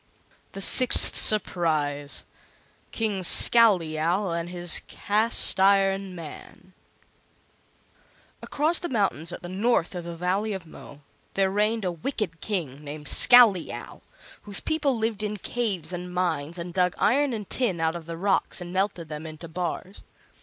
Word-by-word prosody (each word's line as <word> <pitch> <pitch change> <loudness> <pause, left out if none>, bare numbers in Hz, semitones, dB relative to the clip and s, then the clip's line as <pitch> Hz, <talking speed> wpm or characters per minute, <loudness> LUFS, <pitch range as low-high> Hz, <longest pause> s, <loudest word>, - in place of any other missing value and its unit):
The 195 - -1
Sixth 255 +4 +6
Surprise 155 -8 0 0.7
KING 215 -4 -2
SCOWLEYOW 180 -3 +4
AND 170 0 -4
HIS 175 -2 +1
CAST 215 0 0
IRON 195 -1 +2
MAN 170 +3 -12 1.7
Across 310 +4 +1
the 345 - -5
mountains 195 - -1
at - - -8
the - - -6
north 195 0 -1
of 175 -1 -6
the 170 0 -7
Valley 195 +5 -2
of 190 -3 -7
Mo 145 -2 -14 0.3
there 195 -1 +1
reigned 210 +1 -1
a 180 - -1
wicked 170 - -5
King 155 -9 -5
named 150 +1 -9
Scowleyow, 230 -8 +4 0.4
whose 205 -2 +3
people 295 -5 -1
lived 220 -2 -3
in 210 0 -4
caves 195 -7 -4
and 180 0 -6
mines 170 -3 -3
and 170 0 -7
dug 180 -1 0
iron 280 +4 +1
and 215 -4 -6
tin 220 -10 -2
out 160 +1 -1
of 165 -2 -9
the 165 0 -7
rocks 195 +2 0
and 175 0 -8
melted 190 -3 -2
them 155 +1 -8
into 155 +1 -10
bars. 180 +3 -6
185 Hz, 145 wpm, -25 LUFS, 165-210 Hz, 1.7 s, Sixth